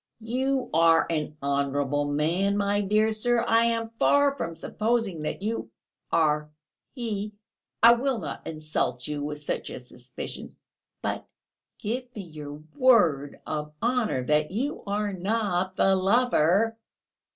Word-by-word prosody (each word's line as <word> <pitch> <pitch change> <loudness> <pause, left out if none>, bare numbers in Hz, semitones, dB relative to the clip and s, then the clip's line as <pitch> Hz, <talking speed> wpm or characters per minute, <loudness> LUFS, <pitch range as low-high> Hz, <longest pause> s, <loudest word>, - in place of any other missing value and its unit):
"You 255 +2 -1
are 165 0 +5
an 155 -1 -2
honourable 140 +1 0
man, 165 +8 +1
my 205 0 +1
dear 215 +2 +2
sir. 235 +2 +2
I 230 +1 +4
am 230 -1 0
far 285 -1 +4
from 170 -10 -4
supposing 215 -4 -1
that 155 +5 -4
you 225 +2 -2 0.4
are 150 -2 +2 0.5
he, 215 -4 -3 0.5
I 235 +1 +10
will 255 +1 0
not 155 -9 -6
insult 155 -6 -2
you 150 -1 -3
with 150 0 -5
such - - -3
a - - -6
suspicion; 125 0 -8 0.5
but... - - -3 0.5
give 245 +3 -4
me 205 - -5
your 150 -3 -9
word 205 - +3
of 150 -1 -4
honour 235 - 0
that 150 +2 +2
you 255 +10 -2
are 205 0 -1
not 190 -1 -1
the 195 0 +4
lover...." 215 0 +3
195 Hz, 135 wpm, -26 LUFS, 150-230 Hz, 0.5 s, I